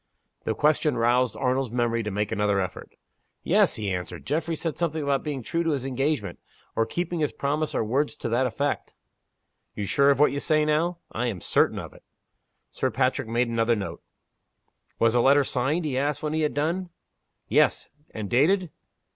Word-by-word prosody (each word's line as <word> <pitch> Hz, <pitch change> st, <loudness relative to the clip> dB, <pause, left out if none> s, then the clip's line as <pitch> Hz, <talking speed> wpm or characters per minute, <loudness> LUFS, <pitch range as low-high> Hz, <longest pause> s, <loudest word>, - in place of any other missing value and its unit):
The 110 Hz, -, 0 dB
question 150 Hz, -2 st, +2 dB
roused 120 Hz, +2 st, +2 dB
Arnold's 130 Hz, -1 st, 0 dB
memory 120 Hz, 0 st, 0 dB
to 105 Hz, -, -3 dB
make 105 Hz, +1 st, -2 dB
another 105 Hz, -2 st, +1 dB
effort. 95 Hz, -, -5 dB, 0.5 s
"Yes," -, -, +3 dB
he 105 Hz, -3 st, -2 dB
answered. 90 Hz, -1 st, -5 dB
"Geoffrey 160 Hz, +3 st, -1 dB
said 160 Hz, 0 st, -3 dB
something 160 Hz, -3 st, -1 dB
about 140 Hz, -1 st, +1 dB
being 140 Hz, -4 st, -4 dB
true 165 Hz, +8 st, -1 dB
to 165 Hz, -2 st, +1 dB
his 135 Hz, -2 st, -3 dB
engagement, 135 Hz, -, -1 dB, 0.4 s
or 115 Hz, 0 st, +1 dB
keeping 175 Hz, +5 st, -2 dB
his 150 Hz, -2 st, +1 dB
promise 150 Hz, +2 st, -2 dB
or -, -, +1 dB
words 140 Hz, +7 st, 0 dB
to 120 Hz, -, -4 dB
that 125 Hz, +3 st, +2 dB
effect." 140 Hz, +5 st, -2 dB, 0.8 s
"You're 105 Hz, -, -3 dB
sure 140 Hz, +7 st, +3 dB
of 140 Hz, -1 st, +3 dB
what 150 Hz, -, +5 dB
you 140 Hz, -, -2 dB
say 155 Hz, +1 st, +2 dB
now?" 165 Hz, +3 st, +1 dB
"I 120 Hz, +2 st, -1 dB
am 105 Hz, -6 st, -3 dB
certain -, -, +2 dB
of -, -, -7 dB
it." -, -, -17 dB, 0.7 s
Sir -, -, -1 dB
Patrick -, -, 0 dB
made 120 Hz, +2 st, +1 dB
another 115 Hz, 0 st, +2 dB
note. 100 Hz, -3 st, -5 dB, 1.0 s
"Was 115 Hz, -1 st, +3 dB
the 120 Hz, -, +4 dB
letter 140 Hz, +3 st, +5 dB
signed?" 140 Hz, +7 st, 0 dB
he 130 Hz, -3 st, 0 dB
asked, 145 Hz, +1 st, -1 dB
when 155 Hz, 0 st, -1 dB
he 160 Hz, -, 0 dB
had 150 Hz, -4 st, 0 dB
done. 170 Hz, +5 st, -1 dB, 0.6 s
"Yes." -, -, +2 dB, 0.2 s
"And 110 Hz, -2 st, -5 dB
dated?" 165 Hz, -, +2 dB
135 Hz, 190 wpm, -26 LUFS, 115-150 Hz, 1.0 s, what